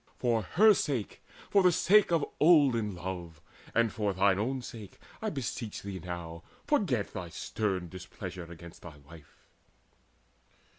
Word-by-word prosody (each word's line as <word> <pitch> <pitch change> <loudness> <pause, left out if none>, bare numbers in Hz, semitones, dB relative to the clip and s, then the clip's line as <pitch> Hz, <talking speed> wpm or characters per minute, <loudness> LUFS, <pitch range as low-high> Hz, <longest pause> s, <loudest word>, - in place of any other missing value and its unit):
For 120 -3 +1
her 210 - +5
sake, 130 - -2 0.3
for 200 - +5
the 180 -1 +5
sake 200 +3 +4
of 165 -4 +2
olden 135 - +4
love, 85 -3 -6 0.4
And 115 -2 +2
for 105 -2 -1
thine 95 +1 +3
own 130 +4 -2
sake, 110 -5 -10 0.2
I 220 - -1
beseech 125 - -5
thee 95 -2 -5
now, 85 -1 -6 0.2
Forget 180 - 0
thy 90 -3 -5
stern 90 +3 -2
displeasure 90 -1 -8
against 85 0 -12
thy 80 -4 -11
wife." 75 +2 -17
100 Hz, 140 wpm, -30 LUFS, 90-135 Hz, 0.4 s, her